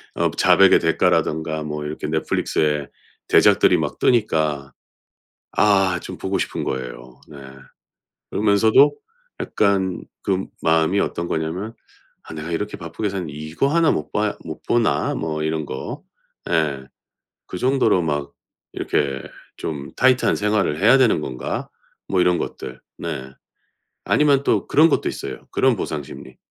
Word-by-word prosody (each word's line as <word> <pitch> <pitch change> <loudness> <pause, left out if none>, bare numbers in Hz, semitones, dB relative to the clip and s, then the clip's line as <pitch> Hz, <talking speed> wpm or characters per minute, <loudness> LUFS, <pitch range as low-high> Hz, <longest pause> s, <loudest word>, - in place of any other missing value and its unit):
어 - - +1
자백의 - - +5
대가라던가 80 0 +1
뭐 75 0 -5
이렇게 75 0 -5
넷플릭스의 75 -2 -1 0.4
대작들이 - - +5
막 - - -3
뜨니까 80 - +1 0.8
아 95 -4 +3
좀 - - -8
보고 - - -2
싶은 - - -3
거예요. 60 -1 -6
네. 75 - -11 0.9
그러면서도 110 +7 +4 0.5
약간 95 -3 0 0.2
그 95 -1 -1 0.2
마음이 80 +4 +2
어떤 85 +1 -2
거냐면 90 +9 -3 0.5
'아 - - -12
내가 80 +2 -6
이렇게 105 +5 -3
바쁘게 95 +5 -4
사는데 90 -6 -5
이거 75 - -2
하나 165 +2 +3
못 75 - -2
봐 - - -1
못 - - -8
보나.' 115 -12 +1
뭐 80 -1 -3
이런 80 -1 -2
거. 65 - -6 0.5
예. 75 -5 0 0.6
'그 90 - -6
정도로 125 -7 +2
막 75 -2 -2 0.4
이렇게 70 -3 -1 0.3
좀 70 -3 -5
타이트한 130 0 +3
생활을 105 -7 0
해야 115 +7 +6
되는 120 -10 +4
건가?' 65 -3 -4 0.4
뭐 95 -2 +1
이런 90 -1 +3
것들. 60 - -6 0.2
네. 65 0 -5 0.7
아니면 140 -2 +3
또 - - +1
그런 160 +3 +5
것도 - - +1
있어요. - - -7
그런 130 -4 +2
보상 75 -5 -3
심리. 65 -1 -12
80 Hz, 280 characters per minute, -21 LUFS, 75-105 Hz, 0.9 s, 해야